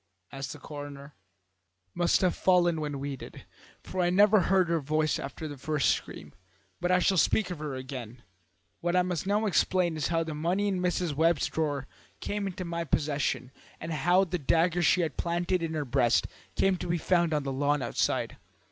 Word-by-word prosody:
asked 135 -2 -5
the - - -8
coroner. 145 -1 -9 0.8
"Must 175 -1 +2
have 185 -2 +2
fallen 175 -3 +3
when 145 -2 -3
we 140 0 -4
did, - - -11 0.4
for 185 - -3
I 175 - +2
never 205 +3 +5
heard 185 0 +3
her 165 0 +1
voice 155 +1 0
after 140 +3 -6
the 145 -3 -8
first 150 +1 +1
scream. 75 -1 -5 0.5
But 175 - -1
I 180 - +5
shall 190 +1 +2
speak 185 +2 +2
of 175 - -5
her 150 -3 -4
again. 130 -2 -7 0.6
What 175 +1 -1
I 180 - +4
must 180 0 -3
now 210 +2 +1
explain 175 -1 +2
is 155 -3 -1
how 165 -1 +1
the 160 -1 -5
money 175 +7 0
in 190 -2 0
Mrs. 180 -3 0
Webb's 160 +1 +2
drawer 145 -4 -2 0.3
came 205 -1 -3
into 185 -1 -5
my 170 0 -3
possession, 140 -5 -1 0.3
and 165 0 -5
how 175 +6 +3
the 180 -1 -3
dagger 165 +4 +2
she 175 +2 +4
had 165 - -2
planted 175 +1 0
in 160 -1 -3
her 150 -2 -2
breast 120 -2 +2 0.3
came 195 -1 +2
to - - -5
be 175 0 0
found 170 0 +2
on 150 -2 0
the 135 -1 -3
lawn 145 +1 +1
outside. 120 - -1
165 Hz, 195 wpm, -28 LUFS, 145-180 Hz, 0.8 s, never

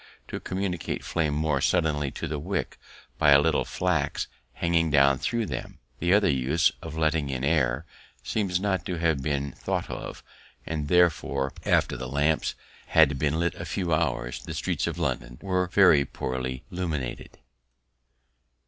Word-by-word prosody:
to - - -5
communicate 95 -4 -3
flame 75 -3 0
more 75 -3 +1
suddenly 75 -3 +1
to 85 - -5
the 75 -1 -3
wick 90 +5 -3 0.4
by 75 - +5
a 70 -1 +8
little 80 +1 +2
flax 80 -6 -1 0.3
hanging 85 -1 +1
down 70 -2 +4
thro' 115 - -1
them, - - -6 0.2
the 85 +2 +1
other 105 +1 +5
use, 70 +5 +2
of 80 - -7
letting 80 -2 +1
in 65 -1 -3
air, 70 -2 +1 0.4
seems 90 - 0
not 95 -3 0
to 90 - -3
have 80 -4 +1
been 70 0 -1
thought - - -3
of; - - -7 0.4
and 75 -2 -3
therefore, 75 -5 +2
after - - +2
the 65 0 -5
lamps 75 +3 +1 0.3
have 75 -4 +4
been 75 +2 +1
lit 85 -1 +1
a - - -7
few 85 -4 -2
hours, 65 -6 -1
the - - -6
streets - - -1
of - - -3
London - - -2
are 90 -1 +1
very 90 -6 +5
poorly 65 -1 -4
illuminated. 80 -9 -4
75 Hz, 155 wpm, -27 LUFS, 70-85 Hz, 0.4 s, a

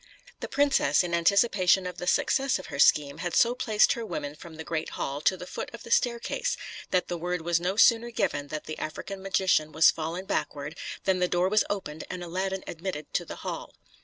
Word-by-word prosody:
The - - -5
princess, 270 - +3
in 175 -1 -4
anticipation 190 +1 +3
of 180 0 -6
the 180 - -5
success 270 +7 +2
of 185 - -9
her 140 - -4
scheme, 145 0 +4
had 175 0 -3
so 235 +1 +5
placed 220 -4 +3
her 235 - -5
women 145 -9 -4
from 160 +1 -12
the 160 - -7
great 160 -1 -3
hall 140 +1 -3
to 185 +4 +2
the 180 - -8
foot - - -6
of 230 - -12
the 230 - -10
staircase, 245 - 0 0.3
that 180 -1 +1
the 175 -1 -4
word 180 0 -2
was 170 0 +1
no 185 +2 -1
sooner 230 +2 +5
given 145 -10 -1
that 155 +1 -5
the 155 - -7
African 190 +5 -6
magician 185 -5 +1
was 160 +1 +6
fallen 165 +4 -4
backward, 150 -4 -3 0.3
than 190 -1 +1
the 180 - +2
door 180 +1 +1
was 215 +1 +4
opened 160 -7 -4
and 180 - -5
Aladdin 190 +2 -3
admitted 165 -3 -6
to - - 0
the - - -7
hall. - - -5
180 Hz, 215 wpm, -27 LUFS, 160-200 Hz, 0.3 s, was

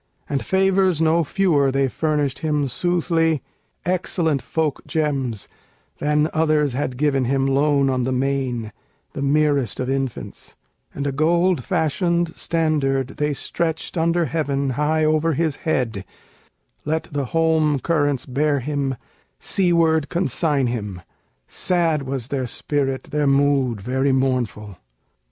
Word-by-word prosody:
And 140 -2 -2
favors 190 -3 +2
no 165 +1 +3
fewer 150 -5 +2
they 135 0 +2
furnished 150 -1 -1
him 150 -3 0
soothly, 165 +2 0 0.4
Excellent 170 -5 0
folk 155 -3 -2
gems, 135 -8 -1 0.5
than 150 +1 +2
others 155 -3 +2
had 130 -1 -2
given 135 -2 +1
him 135 +2 +1
Lone 140 0 +2
on 130 -1 +1
the 125 +2 -1
main, 130 -4 -1 0.4
the - - -5
merest 140 -4 +1
of 130 +1 -1
infants: 135 -2 -4 0.4
And 140 - -3
a 140 - 0
gold 170 +2 +2
fashioned 170 +1 0
standard 145 -5 0
they 150 -1 0
stretched 165 +4 -3
under 170 0 +2
heaven 140 -3 -1
High 155 +4 +1
o'er 155 +1 +2
his 155 0 0
head, 120 - -1 0.8
let 160 +2 -1
the 140 -1 -1
holm 160 0 +2
currents 145 -4 0
bear 145 +2 +1
him, 140 0 -2 0.4
Seaward 165 -5 +2
consigned 145 -5 0
him: 105 -7 -5 0.4
sad 165 - +1
was 130 -2 -4
their 130 -3 -2
spirit, 135 +1 -2
Their 150 -1 +1
mood 135 -5 +2
very 130 +5 0
mournful. 120 -7 -1
145 Hz, 130 wpm, -22 LUFS, 135-160 Hz, 0.8 s, no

